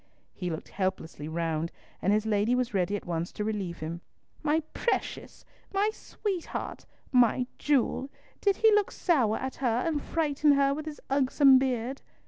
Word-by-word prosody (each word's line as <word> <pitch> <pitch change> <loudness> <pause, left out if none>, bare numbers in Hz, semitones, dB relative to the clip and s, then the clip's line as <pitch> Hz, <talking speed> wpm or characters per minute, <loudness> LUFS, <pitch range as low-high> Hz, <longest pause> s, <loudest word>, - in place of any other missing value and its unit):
He 180 -2 -4
looked 160 -2 -5
helplessly 185 -6 -3
round, 165 0 -1 0.3
and 195 - +2
his 215 +1 +2
lady 215 +2 +2
was 250 -3 -1
ready 195 +1 +1
at 205 - -5
once 170 0 -2
to 210 - -3
relieve 200 -6 -3
him. 165 +2 -4 0.4
"My 310 +1 +2
precious! 475 - -2 0.3
My 405 +2 +2
sweetheart! 390 -5 -5 0.2
My 250 -1 +4
jewel! 275 -1 +1 0.3
Did 400 -1 +3
he 445 +2 +5
look 420 -1 +3
sour 250 - +2
at 265 0 -5
her 245 -2 +1
and 310 -3 0
frighten 300 -2 +2
her 275 0 +3
with 310 +2 -5
his 300 - -7
ugsome 270 0 +5
beard?" 260 0 -1
250 Hz, 160 wpm, -29 LUFS, 195-295 Hz, 0.4 s, he